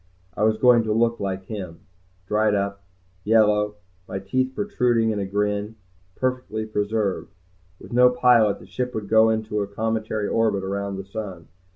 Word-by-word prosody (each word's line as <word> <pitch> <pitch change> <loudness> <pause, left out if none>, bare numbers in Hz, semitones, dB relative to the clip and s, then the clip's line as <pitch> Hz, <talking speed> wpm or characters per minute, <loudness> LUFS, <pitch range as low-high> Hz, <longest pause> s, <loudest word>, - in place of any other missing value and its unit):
I - - -4
was 110 0 +2
going 125 0 +5
to 110 - 0
look 115 +1 +1
like 95 -1 -3
him, 95 -5 -7 0.4
dried 105 +1 +2
up, 100 0 -2 0.4
yellow, 105 -1 +3 0.3
my - - -4
teeth 130 +7 -1
protruding 120 - +1
in 105 - -2
a 100 - -2
grin, 105 +2 -1 0.4
perfectly 125 -4 -2
preserved. 105 -2 -2 0.4
With - - -11
no 125 +1 +6
pilot, 125 -4 +4
the - - -14
ship 125 0 -4
would 105 -2 -4
go 110 +1 +5
into 110 -1 -1
a 100 - -2
cometary 110 0 -2
orbit 110 -4 +1
around 100 0 -3
the 95 - -7
sun. 95 -5 -7
110 Hz, 165 wpm, -23 LUFS, 100-115 Hz, 0.4 s, no